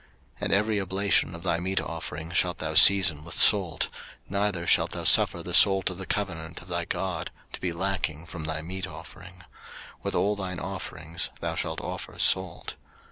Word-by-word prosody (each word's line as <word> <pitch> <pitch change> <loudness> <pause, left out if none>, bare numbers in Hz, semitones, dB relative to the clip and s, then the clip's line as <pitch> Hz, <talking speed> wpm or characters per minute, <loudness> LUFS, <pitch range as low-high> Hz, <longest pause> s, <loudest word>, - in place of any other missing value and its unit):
03:002:013 - - -23
And - - -1
every 105 +1 +1
oblation 95 -1 +1
of 85 - -10
thy 85 -2 0
meat 95 +2 -1
offering 80 0 -7
shalt 90 0 0
thou 80 0 -4
season 85 -4 +7
with 85 -1 -9
salt; - - +4 0.4
neither 100 -3 -2
shalt - - +2
thou - - -5
suffer - - +4
the - - -6
salt 95 -1 +5
of 90 - -9
the 95 - -7
covenant 85 -5 -4
of 85 - -15
thy 85 -1 -2
God 85 -2 -4 0.2
to - - -7
be 90 - -1
lacking 85 -3 -3
from 85 -2 -8
thy 80 0 -4
meat 95 +3 -5
offering: 90 0 -13 0.6
with - - -4
all 105 +1 +1
thine 95 -3 -5
offerings 80 0 -5
thou 85 -1 -3
shalt 80 -1 -4
offer - - -7
salt. 95 -2 +1
90 Hz, 185 wpm, -26 LUFS, 85-95 Hz, 0.6 s, season